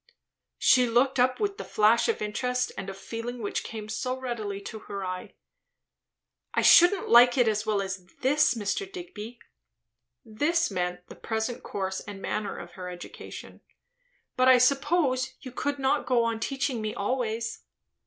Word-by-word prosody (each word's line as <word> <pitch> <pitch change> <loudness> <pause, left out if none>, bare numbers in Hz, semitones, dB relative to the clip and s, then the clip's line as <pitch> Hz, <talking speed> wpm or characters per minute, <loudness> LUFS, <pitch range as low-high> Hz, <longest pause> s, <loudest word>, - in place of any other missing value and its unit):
She 250 -2 +4
looked 255 +3 +2
up, 255 +1 +3
with 410 0 -1
the - - -4
flash 215 +2 +3
of 450 - -1
interest 250 +4 -1
and 195 - -6
of 195 - -7
feeling 230 +4 -6
which 205 -3 -3
came 215 -1 -7
so 255 +4 -3
readily 220 -6 -4
to 220 +2 -7
her 200 -1 -4
eye. 185 0 -6 1.2
"I - - +2
shouldn't 355 +3 +6
like 245 +2 +7
it 245 -2 +4
as 215 0 0
well 205 -2 +1
as 190 -1 -5 0.2
this, 290 0 +3
Mr. 300 - -2
Digby," 245 - -8 0.9
("this" 320 +10 0
meant 180 0 -3
the - - -11
present 225 +2 -3
course 190 -1 -3
and 205 -1 -9
manner 210 +1 -3
of 175 0 -9
her 180 0 -7
education;) 175 -1 -10 0.7
"but 255 0 +3
I 260 -1 +8
suppose 270 0 +2
you 255 - -8
could 285 +3 -2
not 270 -1 0
go 245 -2 +3
on 230 -1 -1
teaching 265 -1 -2
me 215 0 -3
always." 225 +1 -2
235 Hz, 165 wpm, -27 LUFS, 210-260 Hz, 1.2 s, I